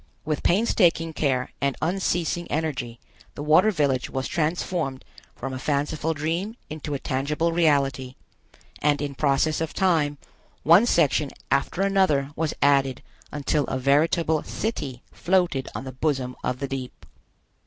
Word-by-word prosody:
With 155 -2 -1
painstaking 175 -5 +2
care 130 -5 0
and 140 -1 0
unceasing 175 -1 -1
energy 130 -7 -3 0.4
the 145 - -5
water 160 +8 +5
village 140 -9 0
was 130 0 -3
transformed 160 -3 -2 0.3
from 135 +1 -5
a 130 - -4
fanciful 150 +3 -1
dream 170 +9 -2 0.2
into 150 -1 -4
a - - -3
tangible 150 +6 -1
reality, 140 -6 +1 0.7
and 145 0 +2
in 145 -1 -3
process 145 +3 +1
of 160 - -3
time 160 -6 +2 0.5
one 175 +9 +6
section 150 - +2 0.2
after 140 +7 +1
another 185 -8 +2
was 160 -1 -1
added 140 -2 +3 0.3
until 145 0 0
a 130 - -2
veritable 155 +4 +2
city 140 - -4
floated 175 -7 0
on - - -4
the 130 - -6
bosom 130 -2 -1
of 125 - -1
the 140 +1 -3
deep. 130 - -6
150 Hz, 140 wpm, -25 LUFS, 135-165 Hz, 0.7 s, one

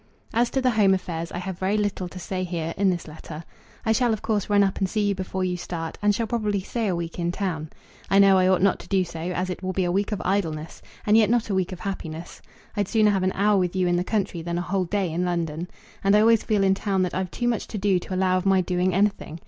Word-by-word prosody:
As 235 +1 +2
to 265 - 0
the 255 -1 +3
home 200 -4 +4
affairs 170 -3 -4
I - - -5
have 185 0 -5
very 195 +3 +1
little 205 -3 -1
to 185 - -11
say 185 +1 -3
here, 165 -2 -3
in 195 0 +2
this 175 -3 -2
letter. 155 +1 -9 0.4
I 220 - +2
shall 235 +1 +3
of 220 - -4
course 210 -3 -1
run 205 -1 +5
up 195 -1 0
and 190 -2 0
see 210 0 +1
you - - +2
before 190 0 -3
you 180 -1 0
start, 165 -2 -5
and 205 0 +3
shall 230 - -1
probably 210 -3 -1
stay 225 +3 -2
a 185 - 0
week 170 0 -5
in 170 0 0
town. 170 -5 -3 0.4
I 195 - +4
know 195 -1 +6
I 185 - +4
ought 185 0 +3
not 200 - +3
to - - -11
do 195 -2 +2
so, 170 -2 -8
as 180 +2 -2
it 180 - -6
will 185 0 -3
be 190 - 0
a 175 - 0
week 200 +4 0
of 210 - -2
idleness, 165 -5 -2 0.2
and 210 - +4
yet 220 -2 +5
not 235 -2 +1
a - - 0
week 190 -1 0
of 185 - -7
happiness. 170 -4 -6 0.3
I'd 205 -3 0
sooner 215 -1 +3
have 195 -2 +1
an 185 0 +1
hour 205 0 +3
with 180 0 -1
you 185 -1 +2
in 175 0 +2
the 175 - +1
country 195 -4 -1
than 170 +1 -3
a - - 0
whole 185 +1 -1
day 190 -1 -1
in 175 +2 0
London. 170 -2 -2 0.4
And 195 +1 +4
I 210 - +6
always 225 0 +5
feel 210 -2 +1
in 190 0 +4
town 195 -1 0
that 180 - -2
I've 185 -1 -2
too 240 - -2
much 235 -2 -1
to 215 - -5
do 195 -2 +2
to 185 - -6
allow 185 0 +2
of 185 - -7
my 190 -1 +4
doing 180 0 0
anything. 195 -5 0
190 Hz, 285 wpm, -24 LUFS, 175-205 Hz, 0.4 s, know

